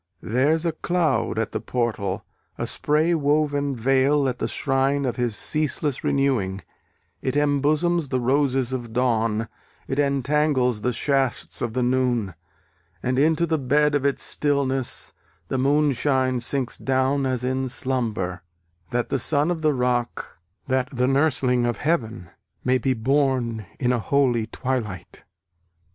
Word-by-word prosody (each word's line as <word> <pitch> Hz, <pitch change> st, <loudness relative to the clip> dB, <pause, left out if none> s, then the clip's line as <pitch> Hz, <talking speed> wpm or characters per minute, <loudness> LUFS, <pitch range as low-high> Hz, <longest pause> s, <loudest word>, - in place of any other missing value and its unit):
There's 145 Hz, +8 st, +1 dB
a 165 Hz, -, +2 dB
cloud 160 Hz, -7 st, 0 dB
at 115 Hz, -1 st, -1 dB
the -, -, -2 dB
portal, 110 Hz, -5 st, -2 dB, 0.3 s
a -, -, -2 dB
spray 155 Hz, +3 st, +1 dB
woven 145 Hz, -2 st, +1 dB
veil 135 Hz, +4 st, +2 dB
At 125 Hz, -1 st, -3 dB
the -, -, -1 dB
shrine 135 Hz, 0 st, 0 dB
of 120 Hz, -2 st, -2 dB
his 120 Hz, -3 st, 0 dB
ceaseless 150 Hz, -1 st, 0 dB
renewing; 120 Hz, -9 st, 0 dB, 0.6 s
It 130 Hz, -, -2 dB
embosoms 150 Hz, +3 st, +1 dB
the 130 Hz, -, 0 dB
roses 130 Hz, 0 st, +1 dB
of 120 Hz, -3 st, -5 dB
dawn, 115 Hz, -3 st, +1 dB, 0.4 s
It 135 Hz, +1 st, -2 dB
entangles 140 Hz, -4 st, +1 dB
the 125 Hz, -, +1 dB
shafts 135 Hz, +1 st, 0 dB
of 115 Hz, -2 st, -2 dB
the 125 Hz, 0 st, 0 dB
noon, 120 Hz, -6 st, +1 dB, 0.7 s
And 130 Hz, +1 st, 0 dB
into 160 Hz, +3 st, +3 dB
the 160 Hz, -2 st, 0 dB
bed 145 Hz, +3 st, +2 dB
of 145 Hz, -2 st, +1 dB
its 140 Hz, -1 st, 0 dB
stillness 135 Hz, -3 st, -1 dB, 0.4 s
The 130 Hz, -, -1 dB
moonshine 135 Hz, -2 st, +2 dB
sinks 125 Hz, +1 st, -3 dB
down 135 Hz, +1 st, +1 dB
as 130 Hz, -2 st, -2 dB
in 130 Hz, +1 st, -1 dB
slumber, 110 Hz, -9 st, -2 dB, 0.5 s
That 120 Hz, 0 st, -1 dB
the 135 Hz, -, 0 dB
son 150 Hz, +5 st, +1 dB
of 165 Hz, -2 st, -3 dB
the 155 Hz, -1 st, +3 dB
rock, 125 Hz, -7 st, -2 dB, 0.3 s
that 130 Hz, -1 st, 0 dB
the 125 Hz, -1 st, 0 dB
nursling 130 Hz, -3 st, +2 dB
of 120 Hz, -, -1 dB
heaven 115 Hz, -, -2 dB, 0.3 s
May 130 Hz, 0 st, +2 dB
be 130 Hz, -1 st, 0 dB
born 125 Hz, -4 st, 0 dB
in 125 Hz, 0 st, +2 dB
a 120 Hz, -, 0 dB
holy 120 Hz, -3 st, +1 dB
twilight! 115 Hz, -8 st, -4 dB
130 Hz, 145 wpm, -24 LUFS, 120-145 Hz, 0.7 s, into